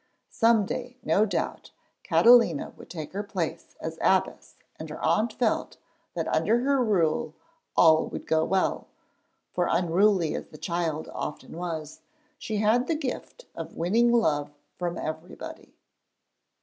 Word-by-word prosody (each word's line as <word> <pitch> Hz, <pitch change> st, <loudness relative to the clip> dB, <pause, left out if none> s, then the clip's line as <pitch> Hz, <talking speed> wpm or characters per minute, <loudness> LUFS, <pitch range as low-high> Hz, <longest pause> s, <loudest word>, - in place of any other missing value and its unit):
Some 225 Hz, -3 st, +3 dB
day, 250 Hz, +4 st, -5 dB
no 215 Hz, +2 st, +3 dB
doubt, -, -, -3 dB, 0.3 s
Catalina 230 Hz, -10 st, +5 dB
would -, -, -14 dB
take 160 Hz, -2 st, -7 dB
her 200 Hz, -, -2 dB
place 205 Hz, -, -4 dB
as -, -, -6 dB
abbess, -, -, +1 dB, 0.2 s
and -, -, -7 dB
her -, -, -7 dB
aunt 220 Hz, +2 st, +2 dB
felt 235 Hz, -3 st, -1 dB, 0.4 s
that -, -, -2 dB
under 235 Hz, +2 st, +2 dB
her 275 Hz, 0 st, +2 dB
rule 165 Hz, -7 st, +1 dB, 0.4 s
all 160 Hz, -1 st, +6 dB
would -, -, -7 dB
go 160 Hz, 0 st, +2 dB
well, 190 Hz, +3 st, 0 dB, 0.7 s
for 175 Hz, -, +1 dB
unruly 175 Hz, 0 st, +2 dB
as -, -, -5 dB
the 155 Hz, -, -13 dB
child 165 Hz, -2 st, -2 dB
often 150 Hz, -, -6 dB
was, 160 Hz, -3 st, -5 dB, 0.4 s
she 215 Hz, -, -3 dB
had 220 Hz, +4 st, +2 dB
the 330 Hz, -, +1 dB
gift 305 Hz, -, -5 dB
of 165 Hz, 0 st, -8 dB
winning 225 Hz, +8 st, +3 dB
love 150 Hz, -11 st, +2 dB, 0.3 s
from 175 Hz, -1 st, -3 dB
everybody. 160 Hz, +2 st, -7 dB
185 Hz, 140 wpm, -27 LUFS, 160-230 Hz, 0.7 s, all